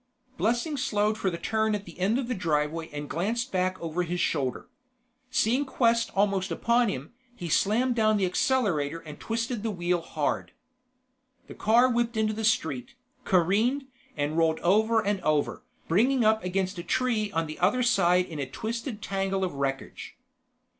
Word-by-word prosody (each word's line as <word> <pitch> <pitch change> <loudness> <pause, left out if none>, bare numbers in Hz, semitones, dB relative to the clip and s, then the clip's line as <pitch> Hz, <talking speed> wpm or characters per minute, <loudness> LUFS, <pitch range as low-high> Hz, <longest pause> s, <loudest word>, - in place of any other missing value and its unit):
Blessing 240 +7 0
slowed 210 -3 +1
for 195 - -1
the 170 - -4
turn 220 +4 0
at 205 -1 -5
the - - -13
end 200 +6 +2
of 260 -3 -2
the 250 - -1
driveway 160 -3 -1
and 145 0 -6
glanced 225 - -2
back 185 0 0
over 165 +1 -2
his 175 0 -2
shoulder. 135 -8 -1 0.6
Seeing 255 +1 +2
Quest 230 -4 +1
almost 195 -1 +1
upon 235 -1 +2
him, 135 - -5 0.2
he 175 -7 -6
slammed 230 +10 +2
down 215 -2 +3
the 195 - +2
accelerator 180 - +1
and 150 -2 -10
twisted 230 0 -2
the 225 - -2
wheel 175 -3 0
hard. 155 -3 -2 0.9
The - - -10
car 235 +4 +4
whipped 235 -2 0
into 215 0 +1
the 220 +1 -4
street, 160 - 0 0.3
careened, 210 +10 +2 0.3
and 150 +3 0
rolled 160 -1 +2
over 220 +4 +3
and 200 -1 0
over, 150 -2 0 0.3
bringing 235 +8 +3
up 220 0 +3
against 185 0 -2
a - - -5
tree 220 -2 0
on 165 0 0
the 155 0 -8
other 210 +8 +2
side 180 -6 +3
in 160 -4 -7
a 135 -2 -3
twisted 225 - -5
tangle 195 -1 -1
of 180 - -1
wreckage. 135 -1 -4
200 Hz, 170 wpm, -27 LUFS, 170-230 Hz, 0.9 s, car